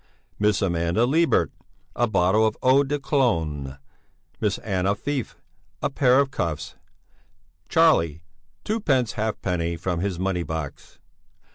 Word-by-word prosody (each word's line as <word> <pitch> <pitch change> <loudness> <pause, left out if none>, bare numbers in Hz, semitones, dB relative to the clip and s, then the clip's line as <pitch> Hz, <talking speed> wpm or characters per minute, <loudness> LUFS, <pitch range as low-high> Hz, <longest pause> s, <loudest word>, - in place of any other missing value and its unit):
Miss 105 0 +2
Amanda 85 +4 +1
Libert, 160 +6 +2 0.4
a 120 - +2
bottle 100 +1 +3
of 110 - -3
eau 130 +2 +5
de 145 +1 -1
Cologne. 80 - -1 0.6
Miss 105 -3 0
Anna 95 -1 -1
Feif, 135 +3 -4 0.4
a 140 - -2
pair 130 -2 +4
of 140 -1 +1
cuffs. 80 - -3 1.0
Charlie, 85 - +3 0.4
twopence 140 - +1
halfpenny 90 -6 -2
from 90 0 -2
his 95 -1 -2
money 95 -1 -1
box. 80 -4 -6
105 Hz, 120 wpm, -24 LUFS, 85-135 Hz, 1.0 s, eau